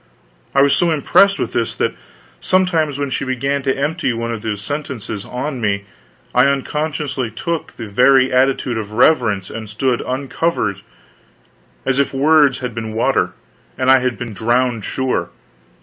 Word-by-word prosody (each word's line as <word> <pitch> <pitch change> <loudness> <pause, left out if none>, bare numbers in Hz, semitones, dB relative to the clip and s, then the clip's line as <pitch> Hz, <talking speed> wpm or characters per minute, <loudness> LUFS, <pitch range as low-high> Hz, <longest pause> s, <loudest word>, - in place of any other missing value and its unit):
I 135 - +6
was 140 - +4
so 175 - +2
impressed 185 +6 +4
with - - -3
this, - - -1
that - - 0 0.5
sometimes 170 -6 +1
when 140 -1 -2
she - - -1
began 135 +2 -1
to 135 0 0
empty 145 -1 -1
one 115 0 -3
of 115 -2 -4
these 105 -2 -3
sentences 115 -4 -5
on 130 +1 -4
me 100 -2 -1 0.5
I 125 +2 +5
unconsciously 140 -2 -2
took 165 +9 -4
the 115 - -7
very 130 +5 +4
attitude 130 -2 +2
of 105 -1 -7
reverence, 115 - +2
and 110 -2 -7
stood 120 +4 0
uncovered; 130 - -2 1.0
and 135 0 +1
if 140 -1 0
words 145 -1 +4
had 125 -2 -4
been 110 -1 -5
water, 115 - +1 0.4
I 130 0 +5
had 125 -1 -1
been 120 -3 -6
drowned, 120 +2 0
sure. 130 -1 -1
130 Hz, 155 wpm, -18 LUFS, 115-140 Hz, 1.0 s, I